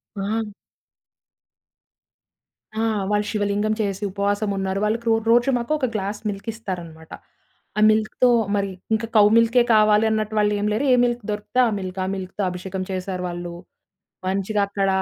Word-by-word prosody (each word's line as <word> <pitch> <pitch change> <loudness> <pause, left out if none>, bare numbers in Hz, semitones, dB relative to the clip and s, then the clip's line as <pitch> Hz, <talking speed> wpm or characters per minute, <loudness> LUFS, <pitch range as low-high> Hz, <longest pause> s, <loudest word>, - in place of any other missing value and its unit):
ఆ! 210 +2 -2 2.3
ఆ! - - +1 0.3
వాళ్ళు 210 0 +1
శివలింగం 205 0 0
చేసి 200 -1 -2
ఉపవాసం 200 +2 -1
ఉన్నారు. 190 0 -1
వాళ్ళకి 230 +2 -1
రో 225 - +5 0.2
రోజు 240 +3 +4
మాకు 235 +4 -4
ఒక 280 - 0
గ్లాస్ 205 0 -3
మిల్క్ 200 +2 -7
ఇస్తారనమాట. 175 -7 -8 0.7
ఆ - - +2
మిల్క్‌తో 215 +3 +2 0.3
మరి 200 -1 0 0.2
ఇంక 220 +1 0
కౌ 210 - +8
మిల్కే 230 +1 +4
కావాలి 215 0 +5
అన్నట్టు 215 0 -1
వాళ్ళు 210 0 +2
ఏం 205 - -1
లేరు. 235 +7 0
ఏ - - +6
మిల్క్ 240 -1 0
దొరికితే 210 +3 -3
ఆ - - +1
మిల్క్. 185 0 -6
ఆ - - -3
మిల్క్‌తో 190 +1 -5
అభిషేకం 185 +1 -5
చేశారు 185 0 -4
వాళ్ళు. 175 0 -6 0.7
మంచిగా 195 +2 0
అక్కడ 200 -1 -1
205 Hz, 150 wpm, -22 LUFS, 195-220 Hz, 2.3 s, కౌ